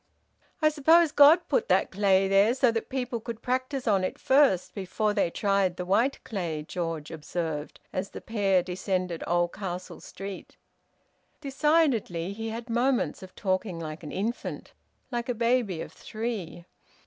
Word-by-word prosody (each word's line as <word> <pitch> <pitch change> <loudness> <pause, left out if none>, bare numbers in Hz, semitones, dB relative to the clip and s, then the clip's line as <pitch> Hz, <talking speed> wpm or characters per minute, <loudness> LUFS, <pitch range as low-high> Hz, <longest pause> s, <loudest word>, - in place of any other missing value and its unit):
"I 310 - +7
suppose 315 +2 +4
God 300 +5 +6
put 475 -1 +1
that - - +2
clay 195 -1 +3
there 200 +5 +4
so 255 -3 +3
that 225 0 -3
people 250 -2 -2
could 230 0 -7
practise 255 +1 -2
on 195 -3 +3
it 185 - -2
first, 265 -10 +3
before 210 +2 -1
they 200 -4 +1
tried 195 -1 +1
the 180 - -4
white 230 +9 +1
clay," 170 -8 -3
George 165 -4 -4
observed, 160 -1 -4
as 190 +2 -2
the - - -8
pair 195 -5 +1
descended 180 -1 -2
Oldcastle 175 +1 -2
Street. 195 0 -9 0.8
Decidedly 270 - +1
he 225 +2 -5
had 230 +2 -6
moments 245 +2 0
of 185 -1 -12
talking 185 -1 -1
like 155 -1 -6
an 155 - -8
infant, 225 +5 -4 0.4
like 240 +1 -3
a 245 - 0
baby 230 -7 +1
of - - -7
three. 205 -7 -5
205 Hz, 150 wpm, -27 LUFS, 180-245 Hz, 0.8 s, I